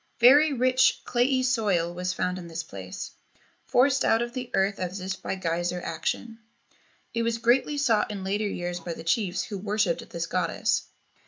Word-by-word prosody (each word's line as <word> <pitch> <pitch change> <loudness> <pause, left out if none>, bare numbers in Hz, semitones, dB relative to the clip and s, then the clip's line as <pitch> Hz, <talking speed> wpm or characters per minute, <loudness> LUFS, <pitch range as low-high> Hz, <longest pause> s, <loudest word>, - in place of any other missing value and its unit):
Very 285 +6 +7
rich 255 -1 +3
clayey 255 +2 +2
soil 205 -9 +1
was 180 +1 -2
found 180 +1 -2
in 175 - -9
this 165 0 -5
place, 95 -10 -8 0.6
forced 270 +2 +3
out 225 +1 +3
of 240 0 -6
the 250 -1 -5
earth 195 +1 +1
as 185 +2 -3
if 190 +1 -5
by - - -3
geyser 175 0 -1
action. 225 +5 -4 0.7
It 230 - 0
was 230 0 0
greatly 250 +5 +2
sought 245 -7 +2
in 200 -2 -5
later 205 +2 -1
years 175 -2 -3
by 170 0 -5
the 160 - -9
chiefs 180 +1 0
who 200 -3 -6
worshipped 205 -3 -1
this 170 -1 -3
goddess. - - 0
200 Hz, 175 wpm, -26 LUFS, 175-240 Hz, 0.7 s, Very